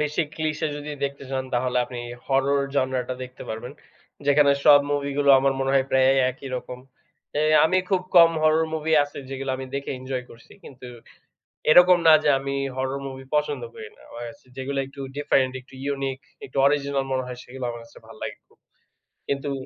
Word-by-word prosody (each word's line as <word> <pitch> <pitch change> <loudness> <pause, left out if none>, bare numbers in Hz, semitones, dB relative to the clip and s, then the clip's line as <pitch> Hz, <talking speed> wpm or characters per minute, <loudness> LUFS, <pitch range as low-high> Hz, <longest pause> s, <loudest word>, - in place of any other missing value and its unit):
বেশি 150 +2 0
clicheé 155 0 -2
যদি 145 +1 -7
দেখতে 140 0 -5
চান 130 -1 -2
তাহলে 125 +1 0
আপনি 125 -1 -8 0.3
horror 135 +1 +2
genre 130 -2 +1
টা 130 - -2
দেখতে 125 0 -12
পারবেন। 115 +4 -6 0.5
যেখানে 145 0 +5
সব 145 -1 +8
movie 140 -1 -1
গুলো 140 -1 +4
আমার 135 0 +2
মনে 135 0 0
হয় 135 -1 +4
প্রায় 130 0 +4
এ - - 0
একই 130 +2 -10
রকম। 125 0 -7 0.6
এ - - +2 0.2
আমি 185 +4 +3
খুব 190 -2 +3 0.2
কম 170 -1 +9
horror 155 +1 +3
movie 160 0 0
আছে 145 - -10
যেগুলা 135 0 -4
আমি 130 0 -6
দেখে 140 0 -3
enjoy 130 -1 -4
করছি। 115 - -16
কিন্তু 125 -2 -11 0.8
এরকম 180 +2 +7
না 160 - +9
যে - - +2
আমি 140 +1 -4 0.2
horror 130 +1 -2
movie 135 0 -8
পছন্দ 150 - -1
করি 440 -1 -9
না। - - -23
আমার 120 0 -7
কাছে 145 +1 -19
যেগুলা 135 +1 -2
একটু 135 0 -12 0.2
different, 135 -3 +2
একটু 130 +1 -19 0.2
unique, 135 -1 -4 0.2
একটু 135 - -11
original 140 -1 +1
মনে 130 0 0
হয় 125 -1 -7
সেগুলা 130 +1 -8
আমার 120 - -7
কাছে 115 - -17
ভাল 115 - -13
লাগে - - -5
খুব। - - -30 0.7
কিন্তু 140 +1 -2
135 Hz, 190 wpm, -24 LUFS, 130-145 Hz, 0.8 s, কম